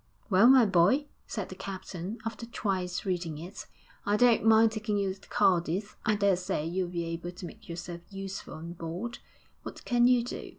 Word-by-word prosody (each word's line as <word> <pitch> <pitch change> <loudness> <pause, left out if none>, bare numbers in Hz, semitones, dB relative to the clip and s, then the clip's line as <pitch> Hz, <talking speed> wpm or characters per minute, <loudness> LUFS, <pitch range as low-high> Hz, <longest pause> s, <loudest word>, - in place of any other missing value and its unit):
'Well, 195 +5 +7
my 260 -2 +8
boy,' 200 - +4 0.2
said 210 -4 -4
the 185 - -8
captain, 190 +1 -6
after 225 0 -5
twice 185 -5 -2
reading 175 -5 -2
it; 175 +6 -8 0.4
'I 205 +1 +2
don't 240 -1 +5
mind 220 0 +6
taking 215 -1 -2
you 195 -2 0
to 195 - -18
Cadiz; 185 +3 +1
I 215 - +2
daresay 190 -5 +1
you'll 175 +2 -1
be 170 -1 -3
able 165 +1 -4
to 180 0 -8
make 215 +2 -12
yourself 170 0 -6
useful 195 -1 -6
on 165 +2 -7
board. 175 +8 -5 0.4
What - - -9
can 240 -1 +4
you 250 -1 +4
do?' 245 - -6
195 Hz, 180 wpm, -29 LUFS, 175-220 Hz, 0.4 s, my